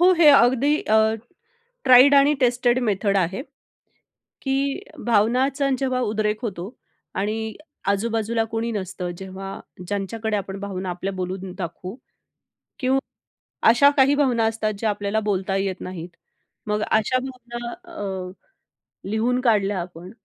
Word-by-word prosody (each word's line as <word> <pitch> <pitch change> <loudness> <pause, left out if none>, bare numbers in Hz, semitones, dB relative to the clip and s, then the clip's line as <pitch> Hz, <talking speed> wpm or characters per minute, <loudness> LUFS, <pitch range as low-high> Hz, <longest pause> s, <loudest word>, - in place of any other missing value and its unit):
हो 365 +1 +7
हे 315 -3 +7
अगदी 270 +3 +5
अ, 220 0 +3 0.7
ट्राईड 255 +3 +8
आणि 280 +2 +5
टेस्टेड 245 0 +3
मेथड 200 -2 +1
आहे, 190 +6 0 1.0
की 275 +4 0 0.3
भावनांचा 250 +6 +2
जेव्हा 260 -2 0
उद्रेक 215 -2 0
होतो 200 0 -5 0.4
आणि 220 +2 -2 0.3
आजू-बाजूला 225 +2 0
कोणी 225 +1 -2
नसतं. 185 -3 -4
जेव्हा 190 0 -7 0.3
ज्यांच्याकडे 210 +3 -2
आपण 195 -1 -4
भावना 190 -2 -4
आपल्या 185 +3 -4
बोलून 185 0 -5
दाखवू 180 +3 -6
किंवा 260 - -25 1.5
अशा 280 +5 +6
काही 275 +1 +5
भावना 255 -6 +2
असतात, 220 -1 0
ज्या 220 0 0
आपल्याला 205 +1 -1
बोलता 195 -2 -1
येत 195 -1 -2
नाहीत. 180 -2 -6 0.6
मग 210 0 0
अशा 220 +4 +2
भावना, 240 -2 -7 0.2
अ, 190 - -4 0.8
लिहून 240 +3 +1
काढल्या 205 -5 +2
आपण, 175 +1 -8
220 Hz, 125 wpm, -23 LUFS, 195-250 Hz, 1.5 s, ट्राईड